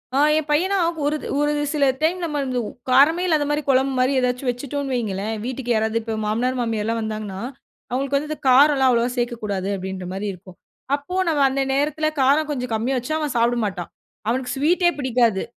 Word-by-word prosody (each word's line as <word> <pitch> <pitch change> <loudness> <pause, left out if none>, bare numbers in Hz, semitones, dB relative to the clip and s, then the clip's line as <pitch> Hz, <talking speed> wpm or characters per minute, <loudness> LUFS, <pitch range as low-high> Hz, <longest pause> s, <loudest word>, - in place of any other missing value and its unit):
ஆ - - +3 0.2
என் 310 -1 -2
பையனா 370 +7 +2 0.3
ஒரு 295 +1 +1 0.2
ஒரு 295 0 +2 0.2
சில 290 -2 +2 0.2
டைம் 335 +4 +1
நம்ம 300 -3 -2
வந்து 255 -2 -2 0.3
காரமே 290 +7 +5
இல்லாத 310 -4 +2
மாரி 295 +1 0
குழம்பு 265 0 +3
மாரி 255 +2 +3
ஏதாச்சும் 250 +1 -1
வச்சுட்டோம்னு 275 +2 -4
வையுங்களேன், 215 -3 -2
வீட்டுக்கு 245 -1 -2
யாராவது 220 +1 +1
இப்ப 225 0 -4
மாமனார், 245 +5 0
மாமியார்லா 225 -1 -1
வந்தாங்கன்னா, 215 -3 -5 0.5
அவுங்களுக்கு 275 +2 0
வந்து 300 +2 -4
இந்த 310 - -4
காரம்லாம் 270 0 +5
அவ்வளவா 235 0 +2
சேக்கக்கூடாது 215 -6 -2
அப்படின்ற 190 0 -6
மாரி 195 +2 -3
இருக்கும். 185 0 -14 0.4
அப்போ 290 +6 -7
நம்ம 310 -3 +1
அந்த 270 +1 -1
நேரத்துல 300 +3 0
காரம் 290 +4 +3
கொஞ்சம் 250 -4 -3
கம்மியா 240 +5 0
வச்சா 255 +6 -2
அவன் 295 -4 -3
சாப்ட 235 +1 +2
மாட்டான். 185 -4 -4 0.4
அவனுக்கு 250 +2 -1
ஸ்வீட்டே 345 +6 +3
பிடிக்காது 240 -6 +1
255 Hz, 175 wpm, -22 LUFS, 225-290 Hz, 0.5 s, காரமே